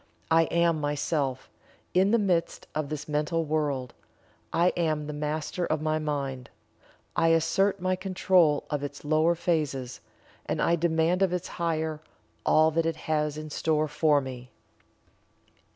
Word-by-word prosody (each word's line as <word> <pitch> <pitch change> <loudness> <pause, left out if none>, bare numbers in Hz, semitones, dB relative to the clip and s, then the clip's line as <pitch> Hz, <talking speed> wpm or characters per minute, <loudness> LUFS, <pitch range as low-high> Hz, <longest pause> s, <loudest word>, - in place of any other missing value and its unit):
I 165 0 +5
Am 170 -1 +1
Myself, 145 -2 -1 0.5
in 190 +2 +4
the 230 - +4
midst 180 -6 0
of 155 -2 -2
this 150 -1 -5
mental 155 +2 0
world 145 -5 -1 0.6
I 175 +2 +3
am 155 -3 0
the 150 - -5
Master 150 +4 -3
of 155 -2 0
my 155 0 0
Mind 140 -4 -3 0.7
I 165 - +3
assert 165 +5 +2
my 185 +1 0
control 185 -5 +2
of 145 -1 -1
its 145 +1 -7
lower 155 +3 +3
phases, 150 -7 -1 0.5
and - - -1
I 170 - +3
demand 170 +2 +1
of 190 -2 +2
its 180 0 -3
higher 160 -2 -2 0.5
all 155 +1 +5
that 165 +1 +1
it 165 - -1
has 150 -1 0
in 155 0 -7
store 155 0 +1
for 150 -1 +2
me. 125 -2 -8
155 Hz, 150 wpm, -27 LUFS, 150-170 Hz, 0.7 s, I